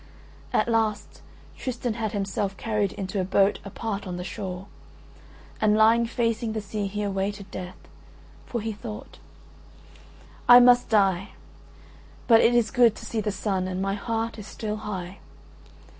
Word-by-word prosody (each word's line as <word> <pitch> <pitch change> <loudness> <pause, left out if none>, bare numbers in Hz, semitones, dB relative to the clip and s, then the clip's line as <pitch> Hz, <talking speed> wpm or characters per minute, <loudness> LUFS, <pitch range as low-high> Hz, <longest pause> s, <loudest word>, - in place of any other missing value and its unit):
At - - +2
last 225 -3 -1 0.3
Tristan 245 -2 -3
had 220 -2 -3
himself 195 -1 -2
carried 210 -3 -1
into 195 0 -3
a - - 0
boat 195 +2 +2
apart 200 0 -5
on 180 -1 -4
the 180 - -4
shore; 185 0 -6 1.0
and 215 0 +4
lying 230 +2 +5
facing 230 -1 -1
the 220 - -2
sea 210 0 -3
he 205 +2 -3
awaited 200 0 -3
death, 180 0 -7 0.7
for 235 - -3
he 220 +1 -3
thought: 215 0 -9 1.3
"I 245 0 +11
must 245 0 +5
die; 195 -3 +2 0.9
but 225 -2 +7
it 240 - +4
is 230 -3 +2
good 235 -3 +5
to - - -10
see 225 - -2
the 210 - -1
sun 190 -1 -2
and 185 0 -3
my 195 +1 0
heart 225 +2 -3
is 210 - -9
still 215 0 -4
high. 195 -3 -6
210 Hz, 155 wpm, -26 LUFS, 195-225 Hz, 1.3 s, I